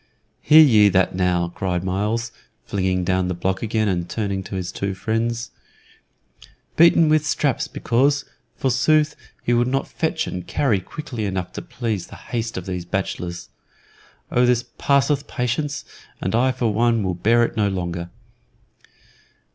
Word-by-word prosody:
"Hear 155 Hz, +1 st, +8 dB
ye 105 Hz, -8 st, +6 dB
that 95 Hz, -1 st, +2 dB
now!" 90 Hz, -1 st, +1 dB
cried 90 Hz, 0 st, -2 dB
Myles, 105 Hz, +5 st, -1 dB, 0.3 s
flinging 95 Hz, -2 st, 0 dB
down 95 Hz, 0 st, +1 dB
the 90 Hz, -, -2 dB
block 95 Hz, +2 st, -1 dB
again 110 Hz, -1 st, 0 dB
and 85 Hz, -3 st, -1 dB
turning 100 Hz, -3 st, -2 dB
to 100 Hz, -, -6 dB
his 90 Hz, -1 st, -3 dB
two 100 Hz, 0 st, -3 dB
friends. 115 Hz, +3 st, -2 dB, 1.2 s
"Beaten 170 Hz, 0 st, +6 dB
with 155 Hz, 0 st, +3 dB
straps 150 Hz, -3 st, 0 dB
because, 140 Hz, +4 st, +1 dB, 0.3 s
forsooth, 150 Hz, +4 st, +2 dB, 0.3 s
he 120 Hz, -, +1 dB
would 120 Hz, 0 st, +3 dB
not 135 Hz, +1 st, -1 dB
fetch 160 Hz, 0 st, -1 dB
and 90 Hz, -1 st, -6 dB
carry 120 Hz, -9 st, +1 dB
quickly 120 Hz, +2 st, -6 dB
enough 95 Hz, -2 st, -3 dB
to -, -, -5 dB
please 110 Hz, -7 st, -4 dB
the -, -, -11 dB
haste 115 Hz, -3 st, -4 dB
of 90 Hz, -, -5 dB
these 90 Hz, -2 st, -4 dB
bachelors. 90 Hz, -1 st, -4 dB, 0.8 s
Oh, 125 Hz, -, +3 dB
this 120 Hz, -1 st, +2 dB
passeth 140 Hz, 0 st, +2 dB
patience, 135 Hz, +3 st, -2 dB, 0.3 s
and 95 Hz, -, -2 dB
I 125 Hz, +3 st, +3 dB
for 120 Hz, -3 st, -1 dB
one 115 Hz, 0 st, +2 dB
will 95 Hz, -1 st, -1 dB
bear 115 Hz, +7 st, +3 dB
it 115 Hz, -, -2 dB
no 105 Hz, -2 st, +2 dB
longer." 85 Hz, -2 st, -3 dB
110 Hz, 155 wpm, -22 LUFS, 95-125 Hz, 1.2 s, Hear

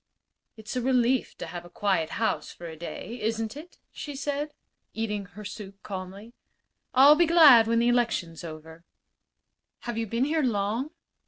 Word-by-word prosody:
"It's 220 Hz, +2 st, -7 dB
a 250 Hz, -, 0 dB
relief 250 Hz, 0 st, +1 dB
to -, -, -5 dB
have 175 Hz, -1 st, -7 dB
a 175 Hz, -, -13 dB
quiet 185 Hz, -3 st, 0 dB
house 225 Hz, -, -1 dB
for 175 Hz, -, -11 dB
a 160 Hz, -1 st, -7 dB
day, 220 Hz, +8 st, -7 dB
isn't 225 Hz, +1 st, -2 dB
it?" 320 Hz, +5 st, -11 dB
she 295 Hz, -, -7 dB
asked, 290 Hz, +2 st, -3 dB, 0.4 s
eating 210 Hz, -3 st, -2 dB
her 205 Hz, +3 st, -12 dB
soup 200 Hz, -1 st, -9 dB
calmly. 195 Hz, +3 st, -7 dB, 0.6 s
"I'll 275 Hz, +3 st, +9 dB
be 340 Hz, +2 st, +3 dB
glad 295 Hz, -9 st, +8 dB
when 230 Hz, 0 st, +2 dB
the 235 Hz, +1 st, +3 dB
election's 230 Hz, -10 st, 0 dB
over." 160 Hz, 0 st, -10 dB, 1.0 s
"Have 240 Hz, -2 st, -4 dB
you 225 Hz, -, -2 dB
been 235 Hz, +5 st, 0 dB
here 315 Hz, +2 st, +1 dB
long?" 225 Hz, +2 st, -1 dB
225 Hz, 165 wpm, -27 LUFS, 195-260 Hz, 1.0 s, I'll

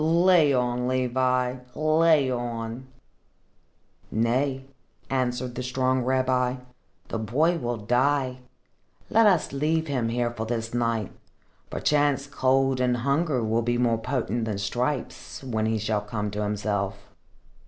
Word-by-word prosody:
"Lay 165 Hz, -1 st, +4 dB
on, 125 Hz, -1 st, 0 dB
Levi, 130 Hz, 0 st, +1 dB, 0.2 s
lay 155 Hz, -3 st, +3 dB
on!" 120 Hz, 0 st, -4 dB, 1.2 s
"Nay," 130 Hz, +4 st, 0 dB, 0.5 s
answered 125 Hz, -1 st, -1 dB
the 125 Hz, -, -4 dB
strong 130 Hz, 0 st, 0 dB
rabbi, 130 Hz, 0 st, +1 dB, 0.5 s
"the 115 Hz, -, -2 dB
boy 155 Hz, +11 st, +1 dB
will 120 Hz, -1 st, -2 dB
die. 130 Hz, +4 st, +1 dB, 0.7 s
Let 225 Hz, 0 st, +5 dB
us 180 Hz, -8 st, +2 dB
leave 155 Hz, +3 st, 0 dB
him 130 Hz, -6 st, -1 dB
here 120 Hz, 0 st, 0 dB
for 110 Hz, -1 st, -5 dB
this 115 Hz, -1 st, -3 dB
night. 115 Hz, -4 st, -1 dB, 0.6 s
Perchance 145 Hz, -2 st, +1 dB
cold 135 Hz, -1 st, +1 dB
and 125 Hz, -1 st, +2 dB
hunger 140 Hz, +1 st, 0 dB
will 110 Hz, +1 st, +1 dB
be 120 Hz, +1 st, 0 dB
more 120 Hz, -2 st, +2 dB
potent 120 Hz, -2 st, -2 dB
than 105 Hz, -3 st, -2 dB
stripes, 125 Hz, +8 st, -3 dB
when 110 Hz, -4 st, -1 dB
he 110 Hz, 0 st, +1 dB
shall 110 Hz, 0 st, -1 dB
come 105 Hz, 0 st, -4 dB
to 105 Hz, +1 st, -3 dB
himself." 105 Hz, -1 st, -1 dB
125 Hz, 130 wpm, -26 LUFS, 115-135 Hz, 1.2 s, Let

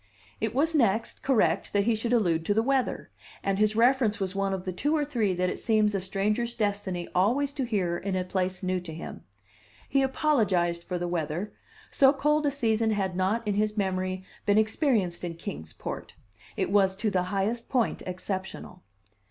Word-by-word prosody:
It 220 Hz, +1 st, -2 dB
was, 320 Hz, +4 st, +2 dB
next, 225 Hz, -7 st, +1 dB
correct 200 Hz, -10 st, +1 dB
that 200 Hz, -1 st, +3 dB
he 230 Hz, +2 st, +2 dB
should 225 Hz, +2 st, -2 dB
allude 175 Hz, -9 st, +2 dB
to 205 Hz, -, +1 dB
the 220 Hz, -, +3 dB
weather; 270 Hz, 0 st, 0 dB, 0.3 s
and 195 Hz, 0 st, 0 dB
his 215 Hz, 0 st, +3 dB
reference 235 Hz, -2 st, +3 dB
was 190 Hz, -1 st, -2 dB
one 195 Hz, 0 st, 0 dB
of 190 Hz, -1 st, -3 dB
the 185 Hz, -, -3 dB
two 295 Hz, -, 0 dB
or 295 Hz, -, +1 dB
three 225 Hz, -10 st, 0 dB
that 180 Hz, +1 st, +1 dB
it -, -, -5 dB
seems 215 Hz, -2 st, +2 dB
a 195 Hz, -, 0 dB
stranger's 210 Hz, +5 st, -1 dB
destiny 200 Hz, -5 st, -2 dB
always 255 Hz, +10 st, +2 dB
to 275 Hz, -3 st, -2 dB
hear 185 Hz, -7 st, 0 dB
in 195 Hz, -1 st, -2 dB
a 185 Hz, -, 0 dB
place 185 Hz, 0 st, -2 dB
new 185 Hz, 0 st, 0 dB
to 170 Hz, -3 st, -8 dB
him: 165 Hz, -, -8 dB, 0.6 s
he 275 Hz, -, +2 dB
apologized 205 Hz, -, +1 dB
for 180 Hz, -, -3 dB
the 175 Hz, 0 st, -2 dB
weather 170 Hz, +3 st, -3 dB, 0.4 s
so 270 Hz, -1 st, +6 dB
cold 300 Hz, +1 st, +2 dB
a -, -, +4 dB
season 225 Hz, -5 st, +1 dB
had 195 Hz, -4 st, -1 dB
not, 205 Hz, +5 st, 0 dB
in 205 Hz, -, +1 dB
his 210 Hz, +1 st, 0 dB
memory, 185 Hz, -1 st, -1 dB, 0.2 s
been 205 Hz, 0 st, +4 dB
experienced 215 Hz, -, +1 dB
in 170 Hz, -1 st, -4 dB
Kings 80 Hz, -, -7 dB
Port; -, -, -7 dB, 0.4 s
it -, -, -1 dB
was 195 Hz, -2 st, +3 dB
to 210 Hz, +2 st, -1 dB
the 185 Hz, -, +2 dB
highest 205 Hz, +5 st, -1 dB
point 245 Hz, -5 st, +1 dB
exceptional. 185 Hz, 0 st, -5 dB
205 Hz, 195 wpm, -27 LUFS, 185-235 Hz, 0.6 s, so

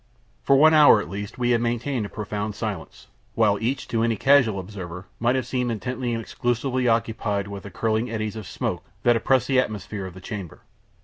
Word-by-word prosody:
For 135 Hz, -, +4 dB
one 155 Hz, +3 st, +6 dB
hour 150 Hz, -2 st, +8 dB
at 75 Hz, -, -6 dB
least 100 Hz, +1 st, -6 dB
we 120 Hz, -1 st, +1 dB
had 120 Hz, -1 st, +3 dB
maintained 120 Hz, -1 st, -1 dB
a -, -, -15 dB
profound 105 Hz, 0 st, -4 dB
silence, 105 Hz, -7 st, -5 dB, 0.3 s
while 105 Hz, -2 st, +3 dB
each, 130 Hz, +4 st, -1 dB
to 115 Hz, -, 0 dB
any 115 Hz, 0 st, +2 dB
casual 125 Hz, -5 st, +4 dB
observer, 90 Hz, -2 st, -7 dB
might 120 Hz, +2 st, +2 dB
have 130 Hz, -2 st, -1 dB
seemed 125 Hz, 0 st, -1 dB
intently 125 Hz, +2 st, -3 dB
and 115 Hz, -, -1 dB
exclusively 125 Hz, +3 st, -1 dB
occupied 110 Hz, -3 st, 0 dB
with 100 Hz, -1 st, -7 dB
the 100 Hz, -, -9 dB
curling 110 Hz, +4 st, -1 dB
eddies 110 Hz, -1 st, -3 dB
of 110 Hz, -4 st, -7 dB
smoke -, -, -3 dB, 0.2 s
that 120 Hz, 0 st, +5 dB
oppressed 125 Hz, +2 st, +2 dB
the 135 Hz, -2 st, +3 dB
atmosphere 105 Hz, -4 st, -3 dB
of 90 Hz, -, -11 dB
the -, -, -9 dB
chamber. 95 Hz, -3 st, -7 dB
115 Hz, 200 wpm, -24 LUFS, 100-125 Hz, 0.3 s, hour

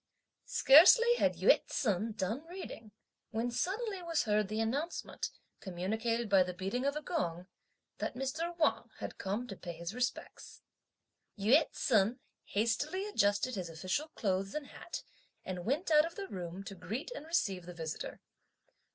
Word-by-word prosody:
Scarcely 380 Hz, -, +8 dB
had -, -, +2 dB
Yü -, -, +5 dB
ts'un 220 Hz, -4 st, 0 dB
done 215 Hz, +7 st, -2 dB
reading, 340 Hz, -, -8 dB, 0.4 s
when 230 Hz, +2 st, -1 dB
suddenly 390 Hz, -, -2 dB
was 335 Hz, -2 st, 0 dB
heard 210 Hz, -2 st, +2 dB
the 215 Hz, +2 st, -3 dB
announcement, 275 Hz, +10 st, -2 dB, 0.3 s
communicated 220 Hz, +6 st, -2 dB
by 195 Hz, -2 st, +5 dB
the 180 Hz, 0 st, -1 dB
beating 195 Hz, +8 st, -2 dB
of 280 Hz, +1 st, +1 dB
a 300 Hz, -, -4 dB
gong, 180 Hz, -, -2 dB, 0.5 s
that -, -, -3 dB
Mr. 315 Hz, +7 st, -3 dB
Wang 320 Hz, -, +1 dB
had -, -, -7 dB
come 205 Hz, +5 st, -2 dB
to 210 Hz, -5 st, -7 dB
pay 175 Hz, -2 st, -7 dB
his 170 Hz, +3 st, -6 dB
respects. 250 Hz, +1 st, -4 dB, 0.7 s
Yü 250 Hz, +10 st, +4 dB
ts'un 225 Hz, 0 st, +2 dB, 0.3 s
hastily 260 Hz, -, 0 dB
adjusted 205 Hz, -, +1 dB
his 185 Hz, -5 st, -4 dB
official 185 Hz, -, -2 dB
clothes 195 Hz, +1 st, -1 dB
and 300 Hz, -1 st, -3 dB
hat, -, -, -7 dB, 0.4 s
and 180 Hz, -2 st, -5 dB
went 305 Hz, -, 0 dB
out 305 Hz, 0 st, +7 dB
of 335 Hz, -, -11 dB
the 395 Hz, -1 st, -5 dB
room 180 Hz, -, -6 dB
to 195 Hz, -, -7 dB
greet 210 Hz, -, -5 dB
and 320 Hz, -11 st, -7 dB
receive 195 Hz, -, 0 dB
the 180 Hz, -, -7 dB
visitor. 160 Hz, -2 st, -5 dB
225 Hz, 155 wpm, -33 LUFS, 190-305 Hz, 0.7 s, Scarcely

